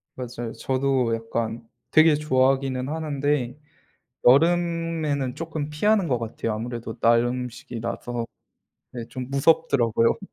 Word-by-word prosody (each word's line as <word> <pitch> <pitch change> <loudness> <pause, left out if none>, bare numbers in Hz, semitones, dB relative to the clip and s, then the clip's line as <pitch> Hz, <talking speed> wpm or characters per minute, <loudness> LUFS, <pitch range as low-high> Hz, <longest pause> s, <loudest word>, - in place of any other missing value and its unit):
맞아요. 120 -2 -6
저도 130 -3 0
약간 115 0 -4 0.2
되게 155 -1 +6
좋아하기는 135 -2 +1
하는데 145 -4 -1 0.7
여름에는 165 -2 +2
쪼끔 160 -3 -4
피하는 195 +4 +2
것 125 -3 +1
같아요. 115 0 -3
아무래도 115 +1 -5
날 115 0 +4
음식이라서 120 -1 -4 0.7
네 120 -2 -5
좀 130 0 -7
무섭더라고요. 135 -6 +2
130 Hz, 280 characters per minute, -24 LUFS, 120-150 Hz, 0.7 s, 되게